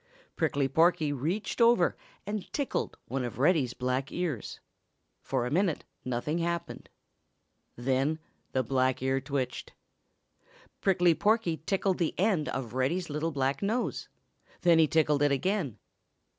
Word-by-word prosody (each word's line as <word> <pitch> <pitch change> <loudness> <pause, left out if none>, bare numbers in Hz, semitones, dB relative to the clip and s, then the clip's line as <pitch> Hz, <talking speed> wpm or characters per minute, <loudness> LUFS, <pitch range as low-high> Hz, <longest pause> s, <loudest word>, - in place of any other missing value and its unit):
Prickly 140 -1 +1
Porky 160 +1 +3
reached 170 - -2
over 230 -7 +5 0.3
and 205 -1 -4
tickled 285 -2 -2
one 130 +1 -2
of 120 - -5
Reddy's 140 -3 +2
black 130 +2 -1
ears. 165 - -3 0.6
For 130 -3 -1
a 125 - -3
minute 175 0 +1 0.2
nothing 130 +6 -2
happened. 170 0 -3 0.9
Then 135 +5 0 0.3
the 130 - +1
black 130 +1 +1
ear 135 0 +1
twitched. 135 -1 -3 1.1
Prickly 180 -3 +4
Porky 205 -3 +2
tickled 195 -1 +1
the 170 - 0
end 185 -5 +1
of 120 -4 -4
Reddy's 155 +7 0
little 150 +3 -1
black 135 -1 0
nose; 220 +5 -1 0.5
then 170 -2 +5
he 160 - +6
tickled 150 -2 +2
it 145 -1 +4
again. 175 - 0
150 Hz, 130 wpm, -29 LUFS, 130-180 Hz, 1.1 s, he